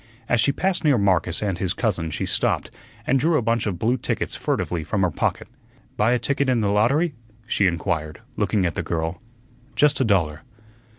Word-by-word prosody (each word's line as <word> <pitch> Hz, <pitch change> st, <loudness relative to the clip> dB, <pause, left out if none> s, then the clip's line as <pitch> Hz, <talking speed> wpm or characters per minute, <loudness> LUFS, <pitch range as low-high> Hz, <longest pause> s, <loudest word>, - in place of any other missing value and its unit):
As 120 Hz, -2 st, +3 dB
she 140 Hz, -, +3 dB
passed 190 Hz, +5 st, -1 dB
near 145 Hz, -5 st, +4 dB
Marcus 95 Hz, -3 st, +1 dB
and 95 Hz, -4 st, -2 dB
his 95 Hz, 0 st, -1 dB
cousin 95 Hz, -8 st, -1 dB
she -, -, -3 dB
stopped, -, -, 0 dB, 0.3 s
and 135 Hz, +1 st, +2 dB
drew 160 Hz, +3 st, +2 dB
a -, -, +1 dB
bunch 115 Hz, -1 st, 0 dB
of 95 Hz, -4 st, -2 dB
blue 120 Hz, +7 st, +1 dB
tickets -, -, -3 dB
furtively 85 Hz, -3 st, -2 dB
from 95 Hz, +5 st, -1 dB
her 90 Hz, -, +2 dB
pocket. -, -, -2 dB, 0.5 s
"Buy 110 Hz, +4 st, +3 dB
a -, -, +3 dB
ticket 140 Hz, +3 st, 0 dB
in 125 Hz, -2 st, +2 dB
the 100 Hz, -1 st, +1 dB
lottery?" 140 Hz, +10 st, +2 dB, 0.3 s
she 100 Hz, -4 st, +2 dB
inquired, 80 Hz, -3 st, -2 dB, 0.2 s
looking 100 Hz, -4 st, +1 dB
at 85 Hz, -, 0 dB
the -, -, -2 dB
girl. 80 Hz, +1 st, -3 dB, 0.5 s
"Just 150 Hz, -1 st, +3 dB
a -, -, +5 dB
dollar." 85 Hz, -9 st, +1 dB
105 Hz, 195 wpm, -23 LUFS, 90-125 Hz, 0.5 s, a